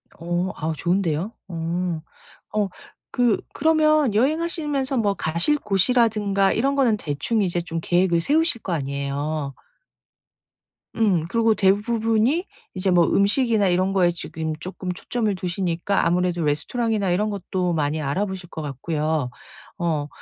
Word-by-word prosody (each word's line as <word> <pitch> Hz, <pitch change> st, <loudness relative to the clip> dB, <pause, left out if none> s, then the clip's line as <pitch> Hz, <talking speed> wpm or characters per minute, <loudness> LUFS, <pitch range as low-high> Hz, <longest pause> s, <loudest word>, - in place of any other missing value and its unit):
어 175 Hz, +2 st, -2 dB
아오 160 Hz, +1 st, -2 dB
좋은데요. 175 Hz, +3 st, 0 dB, 0.2 s
어. 170 Hz, -1 st, -2 dB, 0.5 s
어 210 Hz, -2 st, +1 dB, 0.4 s
그 245 Hz, -3 st, +2 dB
그러면 310 Hz, -5 st, +3 dB
여행하시면서 290 Hz, 0 st, 0 dB
뭐 205 Hz, -3 st, +2 dB
가실 170 Hz, -, +1 dB
곳이라든가 205 Hz, -2 st, +2 dB
이런 275 Hz, +4 st, +1 dB
거는 240 Hz, -6 st, +3 dB
대충 160 Hz, +8 st, -1 dB
이제 175 Hz, -2 st, 0 dB
좀 165 Hz, 0 st, -4 dB
계획을 175 Hz, -1 st, +2 dB
세우실 305 Hz, -, +1 dB
거 180 Hz, -, -3 dB
아니에요. 140 Hz, 0 st, -3 dB, 1.4 s
음. 190 Hz, -8 st, +2 dB
그러고 230 Hz, -1 st, +3 dB
대부분이 225 Hz, -, +2 dB, 0.3 s
이제 185 Hz, 0 st, -1 dB
뭐 175 Hz, -2 st, +5 dB
음식이나 210 Hz, 0 st, +3 dB
이런 185 Hz, +2 st, +1 dB
거에 180 Hz, -3 st, +4 dB
지금 160 Hz, -2 st, -4 dB
쪼끔 185 Hz, 0 st, -5 dB
초점을 215 Hz, +2 st, -2 dB
두시니까 180 Hz, +1 st, -1 dB
아무래도 175 Hz, -1 st, +1 dB
레스토랑이나 200 Hz, +6 st, 0 dB
이런 210 Hz, +4 st, +1 dB
것도 185 Hz, -3 st, -2 dB
많이 155 Hz, 0 st, 0 dB
알아보실 185 Hz, +5 st, -3 dB
것 160 Hz, -, -6 dB
같고요. 150 Hz, 0 st, -2 dB, 0.5 s
어 155 Hz, -4 st, -1 dB
190 Hz, 305 characters per minute, -23 LUFS, 165-225 Hz, 1.4 s, 뭐